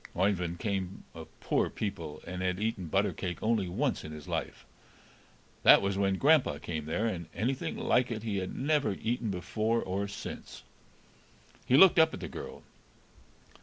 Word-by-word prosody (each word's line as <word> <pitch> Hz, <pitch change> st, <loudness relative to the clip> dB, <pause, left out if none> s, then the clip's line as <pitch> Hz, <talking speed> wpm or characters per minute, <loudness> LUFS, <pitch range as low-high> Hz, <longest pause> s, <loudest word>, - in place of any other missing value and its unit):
Oeyvind 90 Hz, -3 st, +1 dB
came 95 Hz, -3 st, -3 dB
of -, -, -9 dB
poor -, -, +1 dB
people, 85 Hz, -8 st, -5 dB
and 90 Hz, +1 st, -5 dB
had 90 Hz, 0 st, -1 dB
eaten 105 Hz, -4 st, -2 dB
butter 95 Hz, +3 st, +1 dB
cake 90 Hz, -3 st, -4 dB
only 110 Hz, -4 st, +1 dB
once 125 Hz, +9 st, -1 dB
in 75 Hz, -, -7 dB
his 75 Hz, -1 st, -9 dB
life; -, -, -4 dB, 1.0 s
that -, -, +8 dB
was 100 Hz, 0 st, -1 dB
when 95 Hz, -1 st, +1 dB
grandpa 145 Hz, -, +4 dB
came 80 Hz, -1 st, -5 dB
there, 85 Hz, +8 st, -1 dB
and 85 Hz, -7 st, -3 dB
anything 125 Hz, +8 st, -2 dB
like 125 Hz, 0 st, +2 dB
it 110 Hz, -2 st, -4 dB
he 105 Hz, -3 st, -2 dB
had 95 Hz, -1 st, -4 dB
never 145 Hz, -4 st, +1 dB
eaten 115 Hz, +2 st, -2 dB
before 110 Hz, +5 st, -1 dB
or 100 Hz, +1 st, -2 dB
since. 100 Hz, -, -8 dB, 1.0 s
He 130 Hz, -, +5 dB
looked 185 Hz, +1 st, +8 dB
up 160 Hz, 0 st, +4 dB
at -, -, -9 dB
the -, -, -5 dB
girl. -, -, -8 dB
100 Hz, 165 wpm, -30 LUFS, 90-115 Hz, 1.0 s, that